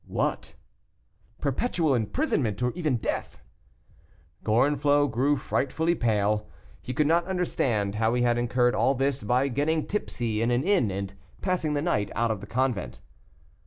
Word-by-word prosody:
"What?" - - -2 0.9
"Perpetual 155 - 0
imprisonment, 120 - 0
or 125 - +1
even 155 -6 -1
death." 110 - -4 1.0
Gorenflot 145 +4 +3
grew 135 +6 +2
frightfully 160 +5 0
pale; 105 -5 0 0.3
he - - -6
could 150 +4 +1
not 170 +3 +2
understand 125 - 0
how 110 +2 +1
he 120 - +1
had 120 -1 +2
incurred 120 0 +2
all 135 - +2
this 135 +1 0
by 125 +6 +1
getting 150 +4 0
tipsy 120 - -2
in 115 - +1
an 120 +2 +1
inn, 185 - +2
and 100 0 -4 0.3
passing 175 -5 0
the 145 - 0
night 105 - 0
out 115 0 +1
of 105 -4 -3
the 100 - -9
convent. 125 -3 -1
125 Hz, 150 wpm, -27 LUFS, 115-150 Hz, 1.0 s, Gorenflot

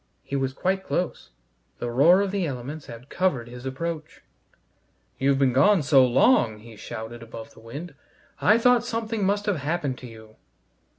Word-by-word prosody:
He 140 - -5
was 135 -1 0
quite 190 +7 -1
close. 180 -2 -3 0.5
The 120 - -4
roar 165 +10 +5
of 200 -1 -1
the 195 -4 -1
elements 140 +3 -6
had 120 +3 -10
covered 145 -11 0
his 125 +2 -8
approach. 155 +3 -5 1.0
"You've 135 0 +2
been 135 -2 +2
gone 190 +5 +4
so 135 -2 +6
long," 125 - +3
he 115 +1 -13
shouted 110 +2 -8
above 115 -1 -10
the - - -17
wind, 145 +9 -8 0.5
"I 215 - +5
thought 245 0 +4
something 225 -2 -3
must 205 +2 +1
have 205 -4 0
happened 145 -2 -2
to 125 - -9
you." 110 -1 -14
140 Hz, 170 wpm, -25 LUFS, 120-190 Hz, 1.0 s, so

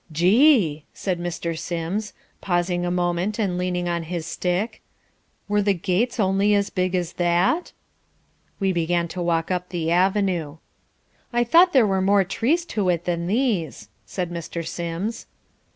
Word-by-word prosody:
"Gee!" 180 - +4
said 185 -3 -2
Mr. 170 -1 -3
Sims, 175 +6 -3 0.3
pausing 175 -1 0
a 175 - -1
moment 175 +3 -1
and 200 -5 0
leaning 180 -1 -1
on 170 -1 -1
his 165 0 -4
stick, 185 +7 -2 0.7
"were 205 0 +2
the 200 -1 +2
gates 200 +8 -1
only 200 +1 +3
as 200 0 0
big 185 0 0
as 175 -2 -2
that?" 175 - +1 0.9
We 195 -2 +1
began 170 0 0
to 180 +2 -5
walk 165 0 0
up 180 0 -2
the 165 -2 -2
avenue. 180 -4 +1 0.7
"I 240 0 +2
thought 340 +9 +5
there 260 -5 +6
were 190 -2 +1
more 200 +1 +4
trees 280 - 0
to 200 -4 +1
it 170 -1 0
than 170 -1 -1
these," 210 - -1 0.2
said 180 -2 -4
Mr. 170 0 -5
Sims. 170 +8 -4
180 Hz, 150 wpm, -23 LUFS, 170-205 Hz, 0.9 s, there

